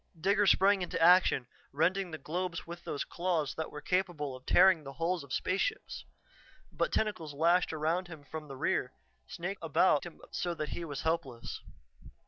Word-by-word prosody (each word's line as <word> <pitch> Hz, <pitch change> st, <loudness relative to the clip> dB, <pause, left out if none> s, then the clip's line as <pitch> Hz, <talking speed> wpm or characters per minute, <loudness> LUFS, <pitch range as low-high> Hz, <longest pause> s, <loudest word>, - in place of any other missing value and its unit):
Digger 200 Hz, +4 st, +3 dB
sprang 195 Hz, +1 st, +5 dB
into 180 Hz, -, -3 dB
action, 175 Hz, -6 st, +5 dB, 0.3 s
rending 180 Hz, +6 st, +1 dB
the 160 Hz, -, -6 dB
globes 170 Hz, +3 st, -4 dB
with 170 Hz, +1 st, -9 dB
those 140 Hz, -, -2 dB
claws 170 Hz, -5 st, -1 dB
that 160 Hz, -, -4 dB
were 150 Hz, -, -7 dB
capable 175 Hz, -7 st, -1 dB
of 130 Hz, -, -14 dB
tearing 185 Hz, -5 st, +6 dB
the 135 Hz, -1 st, -8 dB
hulls 165 Hz, +2 st, -1 dB
of 140 Hz, -, -14 dB
spaceships. 190 Hz, -, -2 dB, 0.7 s
But -, -, -1 dB
tentacles 165 Hz, -9 st, -1 dB
lashed 170 Hz, +4 st, +3 dB
around 160 Hz, +4 st, -1 dB
him 165 Hz, -4 st, -10 dB
from 155 Hz, +1 st, -8 dB
the 135 Hz, -1 st, -8 dB
rear, 125 Hz, -1 st, 0 dB, 0.3 s
snaked 180 Hz, +2 st, -5 dB
about 155 Hz, -1 st, +3 dB
him 175 Hz, -, -10 dB
so 175 Hz, -1 st, -2 dB
that 150 Hz, -2 st, -4 dB
he 175 Hz, -, -5 dB
was 145 Hz, -3 st, -5 dB
helpless. 155 Hz, -8 st, -3 dB
165 Hz, 170 wpm, -31 LUFS, 150-185 Hz, 0.7 s, tearing